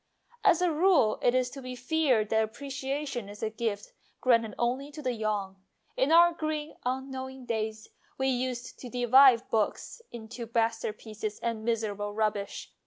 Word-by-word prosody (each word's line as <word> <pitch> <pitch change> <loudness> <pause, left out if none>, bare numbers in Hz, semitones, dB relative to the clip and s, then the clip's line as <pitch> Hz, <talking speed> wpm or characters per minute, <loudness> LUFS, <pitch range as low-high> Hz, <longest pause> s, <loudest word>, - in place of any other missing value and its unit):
As 360 -4 +4
a 355 - +3
rule 315 - +3
it 245 - +3
is 250 -1 +1
to 275 - -8
be 255 0 -6
feared 250 -4 +1
that 220 0 +3
apprecia 275 +3 -4
tion 240 -7 -5
is 205 +1 -9
a 220 - -1
gift 220 -2 -3 0.3
granted 230 -4 +2
only 255 +4 -1
to 300 +1 -10
the 255 -2 0
young. 210 -4 -2 0.4
In 265 +4 +1
our 340 +1 +7
green, 310 -2 -3
unknowing 265 0 -4
days 220 -1 -3 0.3
we 265 - 0
used 250 -1 -2
to 250 - -8
divide 245 0 +6
books 220 - -1
into 235 0 -8
masterpieces 220 -2 -2
and 230 -2 -2
miserable 210 -3 -2
rub 215 -1 +2
bish. 200 -1 -7
245 Hz, 165 wpm, -29 LUFS, 220-270 Hz, 0.4 s, our